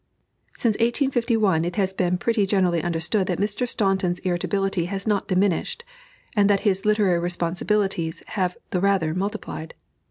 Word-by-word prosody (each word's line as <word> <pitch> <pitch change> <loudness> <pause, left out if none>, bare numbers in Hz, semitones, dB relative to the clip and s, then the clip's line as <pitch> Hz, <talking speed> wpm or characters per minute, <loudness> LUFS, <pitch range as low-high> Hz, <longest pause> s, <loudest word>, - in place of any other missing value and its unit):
Since 230 -3 +2
1851 235 - +2
it 175 +1 -3
has 190 -3 0
been 180 -1 0
pretty 215 0 +1
generally 185 -4 +2
understood 175 +4 0
that 180 - -1
Mr. 210 +5 -1
Staunton's 190 -4 0
irritability 190 0 -1
has 195 +2 -4
not 210 -3 0
diminished, 195 - 0 0.5
and 205 -1 +4
that 200 -1 +3
his 195 -2 0
literary 210 -5 +3
responsibilities 175 0 -1
have 185 -3 -1
the 180 - +1
rather 190 -5 +2
multiplied. 190 -4 -4
195 Hz, 145 wpm, -24 LUFS, 175-210 Hz, 0.5 s, and